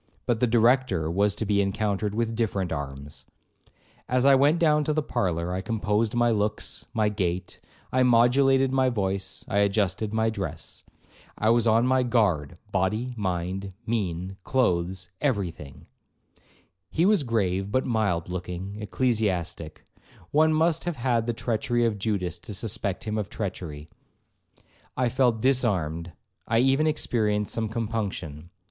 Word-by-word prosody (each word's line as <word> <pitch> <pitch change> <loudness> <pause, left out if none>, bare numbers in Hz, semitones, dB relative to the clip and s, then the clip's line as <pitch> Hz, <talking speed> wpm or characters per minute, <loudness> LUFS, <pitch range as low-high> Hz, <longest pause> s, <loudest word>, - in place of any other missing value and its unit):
But 120 -2 0
the 125 - +3
Director 115 -8 +2
was 100 +3 +2
to 110 - -3
be 100 0 +2
encountered 100 +1 -1
with 115 0 -1
different 100 -6 -1
arms. 70 -1 -6 0.9
As 125 +1 +2
I 140 - +7
went 140 +5 +4
down 150 -3 +3
to 155 - +1
the 155 0 0
parlour, 90 - -1
I 95 - -2
composed 110 +1 0
my 120 0 +3
looks, 105 -1 -2
my 110 -2 +1
gait, 95 -3 -2 0.3
I 130 - +2
modulated 130 +2 +4
my 130 -1 +3
voice, 95 -4 -3
I 100 - +1
adjusted 100 +1 +1
my 110 0 +1
dress. 100 -4 -6 0.6
I 110 +1 +3
was 120 0 +3
on 115 +2 +4
my 130 0 +3
guard, 100 - +1
body, 105 +7 0
mind, 95 -1 -3
mien, 95 -4 -2
clothes, 90 -7 0
every 105 - 0
thing. 75 -4 -13 1.0
He 165 - +1
was 205 -2 +4
a - - -5
grave, 100 -4 0
but 130 - +1
mild 105 -8 0
looking 90 +2 -5
ecclesiastic; 100 -9 -1 0.5
one 155 +2 +4
must 160 +2 +2
have 175 -2 -2
had 120 -2 0
the 120 - 0
treachery 120 +1 0
of 110 -3 -1
Judas 95 -5 -2
to 100 +4 -7
suspect 100 -2 -2
him 110 0 -2
of 105 - -4
treachery. 85 -7 -5 1.1
I 125 -1 +2
felt 120 -3 +2
disarmed, 90 - +1 0.4
I 115 - +2
even 135 +5 +3
experienced 105 -8 0
some 110 -2 -1
compunction. 100 -9 -4
105 Hz, 150 wpm, -26 LUFS, 95-120 Hz, 1.1 s, I